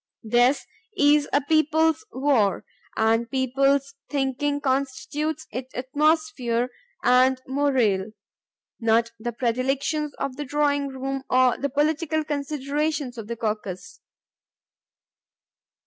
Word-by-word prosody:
This 245 +4 +3 0.3
is 290 -1 +4
a 285 - +3
peoples' 315 +5 +2
war, 260 -8 +1 0.3
and 225 +1 +2
the - - -29
peoples' 275 +2 +1 0.2
thinking 285 +1 -1
constitutes 285 +3 -2
its 255 +1 -6
atmosphere 260 -3 +1 0.3
and 255 +1 +4
morale, 260 -8 +1 0.7
not 230 0 +2
the 240 +2 -3
predilections 265 +5 -1
of 260 -1 -4
the 295 - -3
drawing 285 0 +1
room 270 0 -4
or 255 -1 +4
the 280 - -2
political 310 +2 0
considerations 290 -2 -2
of 215 - -7
the 235 - -4
caucus. 195 -5 -4
270 Hz, 105 wpm, -24 LUFS, 245-290 Hz, 0.7 s, is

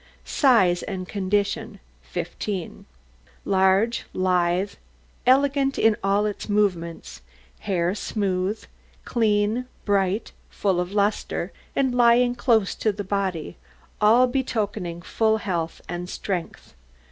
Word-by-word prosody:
SIZE 205 - +3
AND 185 -2 -5
CONDITION 205 +2 -1 0.2
15 175 +1 -5 0.6
Large, 195 +4 +2
lithe, 185 +1 +1 0.6
elegant 275 +1 +3
in 225 -1 +4
all 200 +1 +2
its 210 +1 -4
movements; 180 -5 -1 0.4
hair 180 -3 0
smooth, 200 -1 -2 0.4
clean, 220 +1 +1 0.2
bright, 200 +1 +1 0.2
full 190 -3 0
of 180 +1 -2
lustre, 205 +1 -1 0.2
and 265 -2 +1
lying 245 0 +4
close 225 -5 +2
to 215 - 0
the 205 0 -5
body, 190 - -2 0.4
all 225 +4 +6
betokening 210 -9 -2
full 220 +3 +1
health 170 -6 -3
and 175 0 -5
strength. 185 -4 -5
205 Hz, 105 wpm, -24 LUFS, 185-225 Hz, 0.6 s, all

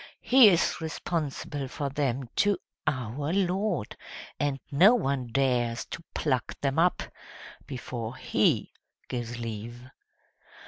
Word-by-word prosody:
He 255 -2 +7
is 175 -2 +1
responsible 150 -3 -3
for 140 +2 -3
them 135 -2 -1
to 205 -2 +3 0.3
OUR 140 +2 -1
LORD, 190 - 0 0.4
and 145 -2 0
no 185 - +7
one 140 - -1
dares 120 -2 +1
to 165 - -6
pluck 130 -5 -1
them 140 +2 +1
up 175 +2 +3 0.6
before 120 -2 -5
HE - - +1 0.4
gives 120 -1 -4
leave." 115 +2 -6
140 Hz, 110 wpm, -28 LUFS, 120-165 Hz, 0.6 s, He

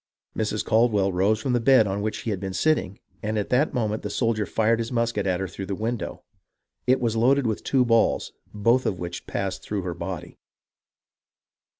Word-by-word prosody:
Mrs. 105 -1 -1
Caldwell 110 -4 +3
rose 100 +4 +2
from 130 +1 -1
the 120 - +3
bed 130 -2 +5
on 100 0 -2
which 105 0 -2
she 115 - -4
had 100 - -2
been 95 -1 -5
sitting, 155 -11 +1 0.2
and 110 +1 -2
at 105 - -2
that 135 +5 +2
moment 110 -4 -1
the - - -4
soldier 115 -4 0
fired 115 +1 +2
his 115 +1 -3
musket 115 -4 0
at 90 -1 +1
her 95 - -2
through 95 +1 -7
the 100 - -2
window. 115 +3 -4 0.6
It 130 +1 +4
was 115 -2 0
loaded 130 +4 +3
with 110 -2 -1
two 130 -2 +2
balls, 115 -1 +2 0.2
both 115 +5 +2
of 95 - -1
which 85 -1 -6
passed 95 -2 -3
through 105 -3 -3
her 90 -1 -3
body. 85 -1 -6
110 Hz, 200 wpm, -25 LUFS, 100-120 Hz, 0.6 s, bed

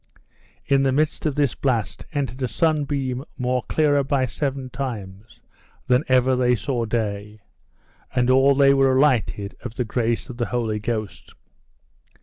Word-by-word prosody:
In 140 -1 +3
the 135 -1 +2
midst 155 +3 0
of 145 - -2
this 140 -5 +1
blast 115 -7 -2
entered 135 -3 -3
a 130 - +1
sunbeam 140 -1 -1
more 125 0 0
clearer 145 -1 +2
by 135 -1 +1
seven 135 +1 -3
times 110 -4 -7 0.4
than 125 +3 +3
ever 130 0 +3
they 125 -1 +2
saw 120 -1 -2
day, 105 -2 -3 0.8
and 125 -1 +2
all 135 +2 +5
they 140 0 +5
were 135 -1 +3
alighted 115 -7 +1
of 120 -2 -7
the 125 - -1
grace 115 +1 -1
of 120 - -9
the 120 - -1
Holy 115 -3 -1
Ghost. 110 -2 -5
130 Hz, 150 wpm, -23 LUFS, 115-135 Hz, 0.8 s, all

